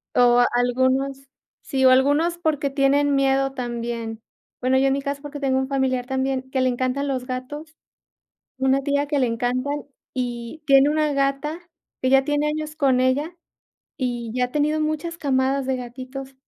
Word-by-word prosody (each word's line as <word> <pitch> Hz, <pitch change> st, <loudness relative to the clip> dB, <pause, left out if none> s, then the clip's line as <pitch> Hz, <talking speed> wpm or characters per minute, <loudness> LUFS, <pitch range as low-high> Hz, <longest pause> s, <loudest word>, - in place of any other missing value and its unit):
o 245 Hz, 0 st, +5 dB
algunos 260 Hz, +2 st, +1 dB, 0.3 s
Sí, 265 Hz, -1 st, -1 dB
o 260 Hz, -, +8 dB
algunos 290 Hz, +6 st, +3 dB
porque 300 Hz, -4 st, 0 dB
tienen 280 Hz, +1 st, +2 dB
miedo 270 Hz, 0 st, +2 dB
también, 235 Hz, -3 st, -4 dB, 0.4 s
bueno, 260 Hz, +1 st, +2 dB
yo 270 Hz, -, +3 dB
en 270 Hz, -, +2 dB
mi 275 Hz, -, -1 dB
caso 280 Hz, +1 st, -4 dB
porque 290 Hz, 0 st, -7 dB
tengo 265 Hz, -2 st, +1 dB
un 265 Hz, 0 st, 0 dB
familiar 260 Hz, -2 st, 0 dB
también 265 Hz, 0 st, -2 dB
que 260 Hz, -, 0 dB
le 255 Hz, -, +3 dB
encantan 255 Hz, +3 st, -1 dB
los 255 Hz, -2 st, -2 dB
gatos, 295 Hz, +5 st, -6 dB, 0.8 s
una 265 Hz, +1 st, +2 dB
tía 285 Hz, 0 st, 0 dB
que 290 Hz, -2 st, 0 dB
le 255 Hz, -, +2 dB
encantan 255 Hz, +5 st, -1 dB, 0.3 s
y 245 Hz, +3 st, -4 dB
tiene 275 Hz, 0 st, +6 dB
una 305 Hz, -1 st, +1 dB
gata 275 Hz, +4 st, -1 dB, 0.4 s
que 260 Hz, -, +1 dB
ya 270 Hz, 0 st, +5 dB
tiene 295 Hz, +1 st, 0 dB
años 305 Hz, 0 st, -4 dB
con 265 Hz, -4 st, +3 dB
ella 290 Hz, +7 st, 0 dB, 0.6 s
y 240 Hz, -4 st, -3 dB
ya 250 Hz, 0 st, +1 dB
ha -, -, -17 dB
tenido 300 Hz, +1 st, +1 dB
muchas 310 Hz, +2 st, -2 dB
camadas 270 Hz, -1 st, +1 dB
de 265 Hz, -1 st, 0 dB
gatitos, 260 Hz, +2 st, -8 dB
270 Hz, 170 wpm, -23 LUFS, 255-285 Hz, 0.8 s, o